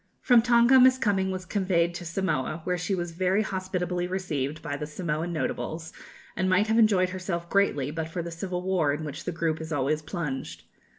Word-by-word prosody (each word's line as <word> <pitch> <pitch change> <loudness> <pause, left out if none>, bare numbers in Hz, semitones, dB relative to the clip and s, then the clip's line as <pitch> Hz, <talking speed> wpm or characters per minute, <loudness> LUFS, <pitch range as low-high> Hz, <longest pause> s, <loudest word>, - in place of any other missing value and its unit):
From 245 -3 +6
Tonga 240 +2 +5
Miss 255 0 +6
Cumming 195 -5 +1
was 185 -1 -4
conveyed 180 -3 +1
to 175 0 -7
Samoa, 170 -3 -2
where 180 +1 0
she 180 +3 -1
was 175 -1 -3
very 185 +4 +1
hospitably 180 -2 -2
received 155 -6 -3
by 145 - -3
the 150 +1 -5
Samoan 160 +1 -3
notables, 160 0 -3 0.4
and 185 +1 0
might 185 +3 +4
have 220 +1 +2
enjoyed 195 -5 +4
herself 180 -2 -4
greatly, 150 -9 +2
but 160 0 -3
for 170 +1 -4
the 170 - -6
civil 180 +1 -4
war 180 -6 +1
in 150 +2 -4
which 150 +1 -6
the 180 - -1
group 165 -1 -1
is 160 0 -7
always 150 +1 0
plunged. 150 -4 -5
180 Hz, 195 wpm, -27 LUFS, 160-190 Hz, 0.4 s, From